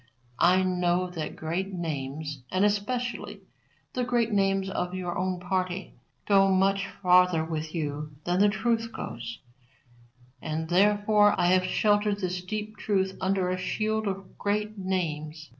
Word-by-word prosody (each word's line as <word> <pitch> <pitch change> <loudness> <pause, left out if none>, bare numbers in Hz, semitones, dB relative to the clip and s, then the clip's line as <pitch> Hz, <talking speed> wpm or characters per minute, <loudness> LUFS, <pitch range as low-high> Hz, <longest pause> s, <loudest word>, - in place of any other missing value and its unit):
I 185 +2 +5
know 180 0 +1
that 165 -3 -5
great 175 +5 -3
names, 150 -3 -4
and 185 +2 +3
especially 240 +4 -2 0.5
the 250 - -1
great 240 -2 +1
names 195 -1 +2
of 180 -1 -3
your 180 -2 -3
own 185 0 -1
party, 185 +1 -2 0.3
go 195 -1 +5
much 195 +1 +2 0.2
farther 180 -3 +5
with 160 0 -4
you 150 -1 -3
than 175 +1 0
the 205 +1 +6
truth 230 +2 0
goes, 115 - -6 1.0
and 160 +1 -3
therefore 205 +2 +4
I 175 +1 +4
have 185 0 +3
sheltered 205 +1 +2
this 180 -2 -2
deep 215 +3 -5
truth 190 -2 0
under 190 -1 +1
a 185 - -2
shield 215 +3 -1
of 195 -1 -5
great 210 +1 -1
names. 160 -5 -3
185 Hz, 140 wpm, -27 LUFS, 175-205 Hz, 1.0 s, the